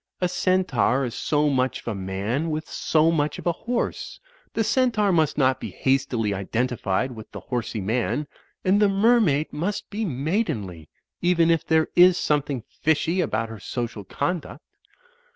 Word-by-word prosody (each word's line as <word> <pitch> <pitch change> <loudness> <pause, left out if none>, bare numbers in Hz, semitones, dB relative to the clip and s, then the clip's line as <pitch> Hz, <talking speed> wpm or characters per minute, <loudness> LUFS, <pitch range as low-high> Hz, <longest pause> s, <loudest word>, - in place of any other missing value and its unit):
A 180 - +1
Centaur 175 - +1
is 120 - -5
so 150 +4 +1
much 130 -2 0
of - - -24
a 115 - -1
man 100 - -2
with 155 0 -3
so 160 +1 +2
much 150 -2 0
of - - -9
a 175 - +3
horse. 240 +8 -3 0.4
The 225 - +2
Centaur 225 -3 +2
must 160 -4 +2
not 130 -2 +2
be - - -5
hastily 130 -6 0
identified 115 +3 -1
with 110 -3 -10
the - - -7
Horsey 120 -3 -3
Man. 120 +7 -1 0.4
And 195 +3 +3
the 205 - +5
Mermaid 195 - +3
must 185 +7 -3
be 215 +2 -2
maidenly; 130 - -2 0.3
even 170 -1 +3
if 165 -1 +2
there 160 -1 +2
is 180 0 +7
something 145 -7 0
fishy 160 +3 0
about 115 -8 -1
her 110 -1 -8
social 120 -3 -4
conduct." 145 - -3
150 Hz, 160 wpm, -24 LUFS, 120-180 Hz, 0.4 s, is